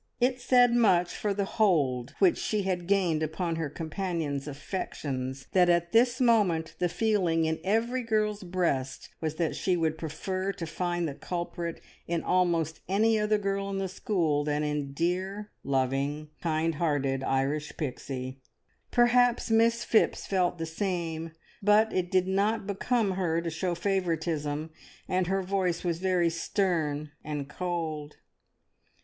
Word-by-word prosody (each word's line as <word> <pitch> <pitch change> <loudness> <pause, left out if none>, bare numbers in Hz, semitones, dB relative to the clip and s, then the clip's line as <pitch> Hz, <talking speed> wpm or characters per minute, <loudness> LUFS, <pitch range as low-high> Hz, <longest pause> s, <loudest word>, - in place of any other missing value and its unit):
It 250 0 +1
said 245 -1 +5
much 190 -7 +3
for 210 - -1
the 200 0 0
hold 145 - +1
which 365 -3 +4
she 210 -2 0
had 180 -2 -2
gained 180 -6 +2
on 170 -3 -1
her 160 -3 -2
companions' 160 -3 -3
affections 135 -3 -4
that 180 -2 +4
at 170 0 +2
this 240 +1 +4
moment 205 -10 +3
the 180 - +1
feeling 180 -6 +1
in 160 0 -1
every 230 +6 +1
girl's 215 -3 0
breast 175 -8 -1
was 155 -1 -2
that 160 0 -1
she 185 -2 +1
would 160 -1 0
prefer 185 +4 -3
to 175 -4 -5
find 175 +1 -1
the 145 - -4
culprit 170 +1 -4 0.3
in 170 -1 -1
almost 170 -3 +1
any 220 +3 +3
other 210 0 +2
girl 195 -1 -2
in 195 - -2
the 195 0 -1
school 170 -6 0
than 150 0 0
in 150 -2 -2
dear, 185 +7 -2
loving, 140 +3 -1
kind 165 0 0
hearted 135 -4 +1
Irish 140 +3 -1
Pixie. 130 -2 -4 0.5
Perhaps 240 -1 +3
Miss 230 +1 +4
Phipps 220 - +2
felt 180 -2 +1
the 165 - -3
same, 165 -2 -3 0.3
but 210 +2 +4
it 180 -1 0
did 185 0 +2
not 200 +3 +1
become 205 +2 0
her 175 -3 0
to 170 -1 -3
show 175 +2 -1
favouritism, 165 -5 -1 0.4
and 185 -1 +1
her 190 +1 0
voice 185 -2 0
was 170 -2 -1
very 180 -2 +2
stern 160 -4 -1
and 145 -2 -4
cold. 160 -3 -4
175 Hz, 150 wpm, -28 LUFS, 155-200 Hz, 0.5 s, said